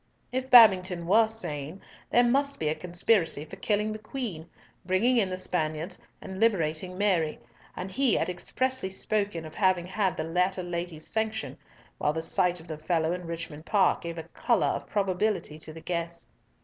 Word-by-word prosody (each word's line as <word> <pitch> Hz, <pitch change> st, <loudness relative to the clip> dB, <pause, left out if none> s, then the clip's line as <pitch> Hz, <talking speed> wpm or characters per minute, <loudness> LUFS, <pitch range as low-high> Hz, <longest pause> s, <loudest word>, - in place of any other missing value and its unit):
If 260 Hz, +1 st, -2 dB
Babington 190 Hz, -8 st, +7 dB
were 220 Hz, +5 st, +5 dB
sane, 170 Hz, -6 st, -6 dB, 0.3 s
there 245 Hz, -, +5 dB
must 280 Hz, +3 st, +1 dB
be 155 Hz, -, 0 dB
a -, -, +1 dB
conspiracy 175 Hz, -2 st, +1 dB
for 155 Hz, -, -10 dB
killing 210 Hz, 0 st, 0 dB
the 215 Hz, -, -7 dB
Queen, 215 Hz, -8 st, -5 dB, 0.3 s
bringing 195 Hz, +8 st, +2 dB
in 200 Hz, -5 st, +2 dB
the 185 Hz, -, -3 dB
Spaniards 165 Hz, 0 st, -2 dB, 0.2 s
and 190 Hz, 0 st, -7 dB
liberating 180 Hz, -4 st, +1 dB
Mary, 180 Hz, -6 st, +1 dB, 0.4 s
and 185 Hz, +1 st, -5 dB
he 260 Hz, 0 st, +2 dB
had -, -, +1 dB
expressly 255 Hz, +5 st, -2 dB
spoken 200 Hz, -3 st, -2 dB
of 155 Hz, -, -9 dB
having 185 Hz, -3 st, +2 dB
had 190 Hz, -1 st, -1 dB
the -, -, -1 dB
latter 180 Hz, +3 st, 0 dB
lady's 170 Hz, -2 st, -5 dB
sanction, 220 Hz, 0 st, -2 dB, 0.4 s
while 150 Hz, -, +1 dB
the 160 Hz, +1 st, -3 dB
sight 180 Hz, +1 st, +1 dB
of 165 Hz, -, -14 dB
the 155 Hz, -2 st, -6 dB
fellow 160 Hz, 0 st, 0 dB
in 180 Hz, -1 st, -6 dB
Richmond 165 Hz, -2 st, -6 dB
Park 205 Hz, -2 st, +3 dB
gave 170 Hz, 0 st, -6 dB
a 165 Hz, -, -4 dB
colour -, -, +2 dB
of -, -, -3 dB
probability 190 Hz, -5 st, -1 dB
to 155 Hz, -, -8 dB
the 160 Hz, +1 st, -10 dB
guess. 170 Hz, -1 st, -4 dB
180 Hz, 175 wpm, -28 LUFS, 165-215 Hz, 0.4 s, Babington